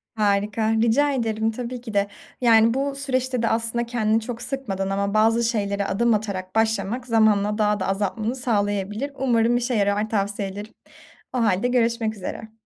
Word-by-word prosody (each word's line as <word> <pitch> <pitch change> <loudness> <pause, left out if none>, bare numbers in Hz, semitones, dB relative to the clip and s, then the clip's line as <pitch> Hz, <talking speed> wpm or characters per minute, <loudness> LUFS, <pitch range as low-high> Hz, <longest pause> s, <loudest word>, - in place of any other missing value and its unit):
Harika, 210 +1 +1
rica 280 +6 +3
ederim 225 -3 0
tabii 245 +2 -5
ki 230 -3 -8
de. 200 0 +2 0.3
Yani, 230 -1 +5
bu 275 +1 -1
süreçte 260 -3 -1
de 230 - +2
aslında 230 +1 -1
kendini 225 -2 +1
çok 235 +1 -6
sıkmadan 200 -9 -3
ama 200 +1 -1
bazı 225 +2 +3
şeylere 200 -3 -1
adım 235 +4 +2
atarak 195 -3 -3
başlamak 225 +2 0
zamanla 215 -2 +2
daha 210 -1 +1
da - - -1
azaltmanı 210 +4 -1
sağlayabilir. 210 +1 -1
Umarım 240 -3 +2
işe 245 +1 -1
yarar, 205 +1 +1
tavsiyelerin. 200 0 -3 0.6
O 255 - -2
hâlde 215 -1 +2
görüşmek 230 -2 +1
üzere. 220 +3 -7
220 Hz, 155 wpm, -23 LUFS, 205-240 Hz, 0.6 s, Yani